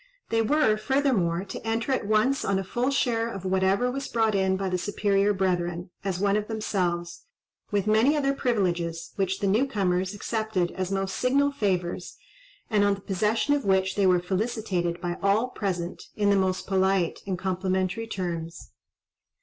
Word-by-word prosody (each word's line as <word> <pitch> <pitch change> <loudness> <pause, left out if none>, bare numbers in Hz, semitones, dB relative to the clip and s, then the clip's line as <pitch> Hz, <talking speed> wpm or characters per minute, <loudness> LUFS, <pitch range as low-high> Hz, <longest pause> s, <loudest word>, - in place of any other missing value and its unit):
They 225 0 +2
were, 225 -2 +3
furthermore, 215 -9 +1
to 190 - -7
enter 225 +3 -1
at 255 -6 0
once 215 +6 +2
on 195 - +1
a 195 - -1
full 240 +7 -1
share 235 -4 +1
of 195 -4 -7
whatever 190 +6 +2
was 275 +1 -4
brought 225 -2 +1
in 190 -1 +2
by 195 0 -2
the 180 -1 -1
superior 200 +1 +1
brethren, 175 -2 -1
as 190 -3 -1
one 200 0 +2
of 210 0 -1
themselves—with 195 - -3
many 220 +8 +4
other 275 -1 +1
privileges, 175 -10 -1
which 195 -1 -1
the - - +1
new 215 +8 +3
comers 190 -4 0
accepted 215 -4 -1
as 185 0 -3
most 195 0 -1
signal 280 +3 +2
favours, 185 -8 -2 0.5
and 210 -3 +2
on 200 0 +3
the 195 - -13
possession 210 +8 +1
of 290 -2 0
which 190 -1 +2
they 200 -2 +2
were 180 -1 +4
felicitated 185 -2 -2
by 175 0 -4
all 205 +5 +2
present, 180 -7 -4
in 205 -1 +2
the - - +4
most 190 -1 0
polite 190 -2 +1
and 190 -2 -1
complimentary 190 +3 -1
terms. 170 -5 -5
195 Hz, 170 wpm, -26 LUFS, 185-225 Hz, 0.5 s, many